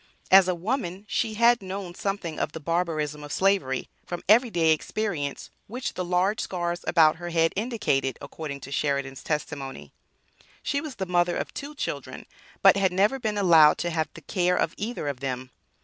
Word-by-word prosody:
As 190 -1 +8
a 185 - +1
woman 195 0 -3
she 215 +1 -1
had 235 +1 +4
known 190 -1 -6
something 190 -4 -3
of 150 - -2
the 160 - -6
"barbarism 155 -2 -1
of 145 - -8
slavery", 190 -10 +1 0.2
from 175 -1 -6
every 235 +5 +6
day 165 -5 +3
experience, 160 -3 -2 0.2
which 250 +4 -4
the 185 - -3
large 180 +5 +1
scars 175 -3 -3
about 160 -2 +5
her 175 +1 -6
head 165 -1 +2
indicated 205 - 0
according 140 -3 -7
to 135 - -9
Sheridan's 140 -2 -1
testimony. 145 -3 -4 0.7
She 280 +1 0
was 305 -6 -7
the 190 - -3
mother 175 -1 +1
of - - -4
two 290 +2 -7
children, - - -5 0.4
but - - +8
had 190 -2 +2
never 205 +8 +2
been 215 -4 -2
allowed 165 -6 +6
to 175 - -2
have 160 -1 -1
the 170 - -10
care 180 +2 +1
of 160 - 0
either 215 -6 -4
of 140 -3 -3
them. 130 -1 -4
175 Hz, 180 wpm, -26 LUFS, 155-205 Hz, 0.7 s, As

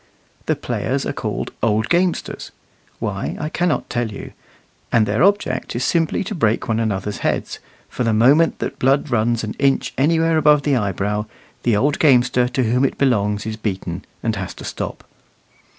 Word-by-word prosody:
The - - +2
players - - -2
are - - -2
called - - -4
"old 110 0 +1
gamesters" 175 0 0 0.5
why, - - -3
I 150 - -3
can't 175 -1 0
tell 120 -2 -2
you 100 - -8 0.6
and 115 -2 +4
their 105 +3 0
object 195 - +1
is 120 - -1
simply 165 0 +1
to 195 - -5
break 115 - 0
one 115 0 0
another's 105 -2 -2
heads; - - -2 0.3
for - - -3
the 115 - +2
moment 135 +9 +4
that - - -5
blood 135 +2 +2
runs 115 0 +1
an 105 - -3
inch 140 -1 +1
anywhere 165 +3 +3
above 150 -1 +4
the 145 -2 +2
eyebrow, 105 0 -1 0.3
the 115 -4 +2
old 145 +6 +1
gamester 125 -3 +4
to 125 +1 -1
whom 125 +3 +1
it 135 - 0
belongs 105 -6 +1
is 110 0 -4
beaten, 95 -4 -4 0.2
and 110 -2 -1
has 95 -2 -5
to - - -10
stop. - - -5
120 Hz, 175 wpm, -20 LUFS, 110-145 Hz, 0.6 s, and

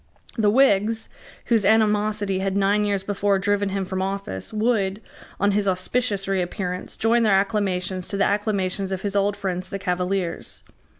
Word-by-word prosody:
The 215 -3 +3
Whigs, 220 -2 +3 0.4
whose 225 -3 +2
animosity 210 -2 +2
had 195 0 -1
nine 200 +1 +2
years 200 -2 0
before 200 0 +1
driven 200 +1 0
him 195 0 -2
from 185 0 -3
office, 195 - -4
would, 215 -3 0 0.4
on 200 +1 +3
his 200 0 +1
auspicious 195 +2 0
reappearance, 180 -1 -3
join 230 +2 +3
their 205 -4 +4
acclamations 190 -3 -1
to 200 - -3
the 195 - +3
acclamations 200 -2 -1
of 190 0 -3
his 200 -1 -2
old 200 0 +1
friends 185 -2 -3
the 195 - -3
Cavaliers. 180 -1 -2
200 Hz, 160 wpm, -23 LUFS, 190-210 Hz, 0.4 s, their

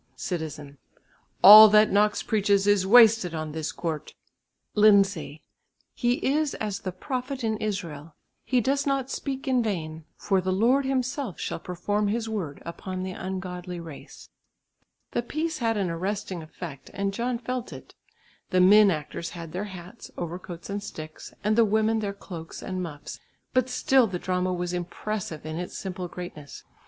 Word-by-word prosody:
Citizen. 150 -5 -5 0.6
"All 215 +2 +12
that 215 0 +5
Knox 210 +1 +2
preaches 205 -3 +2
is 205 -2 +3
wasted 220 -6 +6
on 155 -1 -4
this 160 0 -3
court." 160 -3 -5 0.6
Lindsay. 195 -7 +3 0.5
"He 240 -1 +1
is 295 +1 +1
as 210 -2 -3
the 185 - -4
prophet 255 +6 -4
in 220 -1 0
Israel, 165 -8 -5 0.3
he 255 -2 +1
does 275 +4 0
not 270 -1 0
speak 270 0 -4
in 255 -2 +3
vain; 160 -7 -4
for 195 -2 +1
the 185 +1 -1
Lord 240 +8 +3
Himself 260 - -2
shall - - -3
perform 205 +5 -2
His 225 +2 -1
word 190 -10 -4
upon 185 +2 -5
the 190 - -4
ungodly 180 -1 -5
race." 165 -4 -11 0.8
The - - 0
piece 310 +6 -3
had 225 -2 0
an 190 -4 -1
arresting 185 +1 -3
effect, 155 -3 -9
and 200 0 -1
John 240 +3 -1
felt 250 +1 -4
it. - - -11 0.6
The 185 - +2
men 205 +3 +7
actors 160 0 -3
had 170 -2 -8
their 185 +5 -3
hats, 185 +2 -10
overcoats 175 0 -6
and 205 0 -4
sticks, 155 -5 -9
and 210 +1 +2
the 230 - +6
women 220 +1 +2
their 205 -2 -2
cloaks 175 -5 -9
and 185 -1 -4
muffs, 150 -5 -7 0.3
but 255 0 +2
still 255 -1 +3
the 185 -3 -3
drama 185 0 -1
was 180 0 -3
impressive 180 -2 -4
in 155 +1 -4
its 180 +1 -5
simple 185 -2 -5
greatness. 170 -5 -9
195 Hz, 160 wpm, -26 LUFS, 175-225 Hz, 0.8 s, All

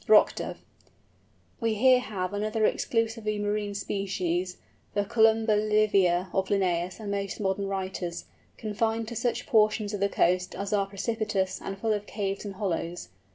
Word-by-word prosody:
ROCK - - +7
DOVE. - - -5 1.0
We 225 -3 +1
here 255 +3 +6
have 195 -6 -4
another 215 +1 0
exclusively 225 -2 0
marine 205 0 -1
species, 185 -3 -2 0.4
the 205 0 +1
Columba 220 +1 +4
livia 210 -4 +3
of 190 0 +1
Linnæus 185 -2 0
and 210 -2 -4
most 200 -1 -3
modern 195 0 0
writers, 185 -3 -3 0.3
confined 225 +1 -1
to 235 - -6
such 235 +1 -1
portions 215 -1 +3
of 205 - -2
the 200 +1 +2
coast 180 0 +1
as 200 +1 -3
are 200 -1 +2
precipitous 200 -1 -2
and 195 - -5
full 220 +2 0
of 205 0 -3
caves 195 -2 -3
and 200 -1 -5
hollows. 175 -3 -3
205 Hz, 155 wpm, -28 LUFS, 190-215 Hz, 1.0 s, ROCK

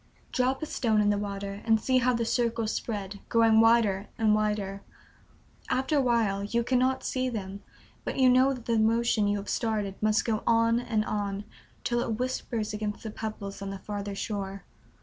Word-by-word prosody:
Drop 260 +3 0
a - - 0
stone 225 -7 +1
in 205 0 +3
the 205 - +1
water 200 0 -5
and 225 -1 +3
see 255 +3 +2
how 250 0 +3
the 235 -1 0
circles 230 -2 0
spread, 200 -3 -4
growing 225 -1 +5
wider 225 -4 +3
and 220 -3 +3
wider. 210 -2 -1 0.9
After 265 +4 +1
a - - +4
while 225 -6 +1
you 235 +3 0
cannot 255 +1 +1
see 255 0 -1
them, 200 -4 -5 0.4
but - - -4
you 260 -1 +5
know 255 +2 +5
that 250 -3 -6
the 230 -1 +1
motion 225 -1 +2
you 205 0 +1
have 200 - -6
started 215 -4 -1
must 215 0 +2
go 220 -2 0
on 230 0 +4
and 220 -3 -1
on 205 -1 -3 0.4
till 240 0 0
it 225 -2 -1
whispers 235 -3 -2
against 210 -1 -4
the 220 - -5
pebbles 210 -2 -6
on 195 - -4
the 195 - -5
farther 200 0 -5
shore. 195 -1 -4
220 Hz, 190 wpm, -28 LUFS, 205-235 Hz, 0.9 s, growing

